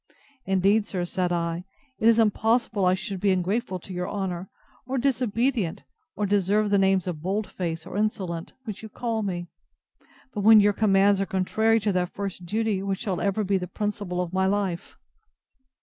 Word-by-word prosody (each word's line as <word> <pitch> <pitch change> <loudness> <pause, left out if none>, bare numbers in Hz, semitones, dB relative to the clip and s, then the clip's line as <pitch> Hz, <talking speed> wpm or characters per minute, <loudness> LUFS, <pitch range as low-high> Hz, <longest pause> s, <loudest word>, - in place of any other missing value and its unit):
Indeed, 195 +3 +3
sir, 180 -4 -2
said 180 0 -1
I, 170 0 -1 0.4
it 220 - +3
is 230 -1 +6
impossible 225 -1 +2
I 180 0 +4
should 190 0 -5
be 200 - +2
ungrateful 190 +3 0
to 190 - -9
your 180 0 -3
honour, 190 -2 -3 0.4
or 265 +1 -1
disobedient, 245 -6 0 0.3
or 210 - -1
deserve 205 +1 +2
the 200 - +4
names 190 -2 +3
of 170 -5 -4
bold 200 +5 -1
face 165 -4 -4
or - - -8
insolent, 190 -6 -2
which 215 -5 -6
you 220 - -9
call 225 0 -2
me, 180 -4 -3 0.9
but 210 - -2
when 220 +1 +8
your 205 0 +4
commands 200 -1 +3
are 195 - -1
contrary 220 +4 +2
to 205 0 +1
that 180 0 -1
first 195 -3 -5
duty 215 -1 0
which 195 -1 -2
shall 190 -4 -2
ever 200 +2 0
be 195 -1 +1
the 180 - -5
principle 205 -3 -3
of 180 0 -4
my 190 0 +2
life! 190 -3 -2
195 Hz, 180 wpm, -26 LUFS, 185-215 Hz, 0.9 s, when